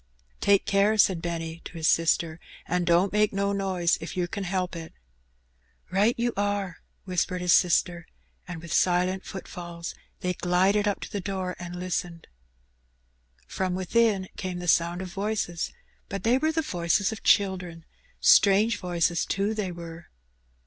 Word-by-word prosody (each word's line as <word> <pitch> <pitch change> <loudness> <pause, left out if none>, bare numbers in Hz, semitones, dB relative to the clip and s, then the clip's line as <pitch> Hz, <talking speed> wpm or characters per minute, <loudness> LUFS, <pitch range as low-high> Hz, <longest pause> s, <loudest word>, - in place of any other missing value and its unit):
''Take 200 -1 +3
care/' 200 +2 +2
said 185 -4 +4
Benny 165 -1 -4
to - - -9
his 165 -2 -1
sister, 165 0 +2 0.3
"an' 180 0 0
don't 175 +3 +3
make 210 0 +3
no 200 0 0
noise 190 -3 0
if 165 - -7
yer 180 - +1
can 195 +3 -5
'elp 185 -1 -2
it." 165 -1 -8 1.0
''Right 205 +5 +3
you 240 0 0
are/' 200 -3 -1 0.3
whispered 180 0 -1
his 180 -1 +3
sister, 175 -1 +2 0.4
and 175 -2 -7
with 170 - -5
silent 185 +1 +2
footfalls 175 -3 -7 0.3
they 180 0 0
glided 190 +4 +2
up 205 - -1
to - - -7
the 205 - -3
door 185 -1 -3
and 175 0 -7
listened. 175 -2 -4 1.2
Prom 185 -1 -2
within 195 +1 +1
came 185 -1 -4
the 175 0 -6
sound 170 +2 +2
of 185 - -7
voices, 200 -4 -2 0.4
but 195 -1 -5
they 240 +3 +3
were 315 +2 +1
the 320 0 -1
voices 175 - 0
of 220 - -7
children 180 -5 +1 0.2
— - - -36
strange 205 +2 +5
voices, 175 -1 0
too, 200 +3 -1
they 210 -4 -3
were. 170 -1 -9
185 Hz, 160 wpm, -26 LUFS, 175-200 Hz, 1.2 s, strange